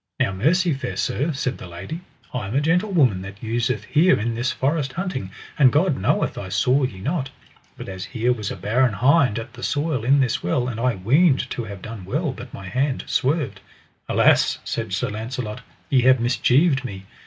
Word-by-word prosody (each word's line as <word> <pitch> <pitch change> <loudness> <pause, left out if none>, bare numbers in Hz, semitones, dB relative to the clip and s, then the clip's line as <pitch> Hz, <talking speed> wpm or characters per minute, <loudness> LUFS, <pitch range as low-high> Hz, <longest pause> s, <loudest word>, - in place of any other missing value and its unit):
Now - - +2
mercy, 165 - +2
fair 135 - -4
sir, 150 +5 0
said 130 -3 -3
the - - -8
lady, 90 - -7 0.3
I 125 -6 -3
am 110 - -4
a - - +4
gentlewoman 160 - +2
that 100 +3 -10
useth 115 -1 -1
here 155 - +3
in 115 +2 -1
this 120 +3 -1
forest 135 -1 -1
hunting, 170 - -3 0.3
and 130 -3 +7
God 155 +1 +2
knoweth 95 - 0
I 95 - -6
saw 125 +8 +2
ye 120 -8 -2
not; 135 - -2 0.5
but - - -8
as 95 -1 -6
here 120 0 0
was 105 -4 -4
a - - -4
barren 120 +2 +1
hind 125 +1 +3
at 115 +1 -6
the 125 - -11
soil 145 -4 -1
in 135 +4 +4
this 130 -3 +1
well, 125 +8 0
and 115 -3 -4
I 125 0 +1
weened 135 - +3
to 120 - -3
have 100 -3 -9
done 110 -3 -7
well, 145 - -1
but 125 -1 -10
my 95 - -9
hand 130 +6 -1
swerved. 130 -8 0 0.5
Alas, - - +4
said - - -4
Sir - - -1
Launcelot, 110 +1 -5 0.3
ye 130 -2 +5
have 130 +1 +5
mischieved 135 +4 +2
me. 95 -6 -7
125 Hz, 200 wpm, -22 LUFS, 110-145 Hz, 0.5 s, and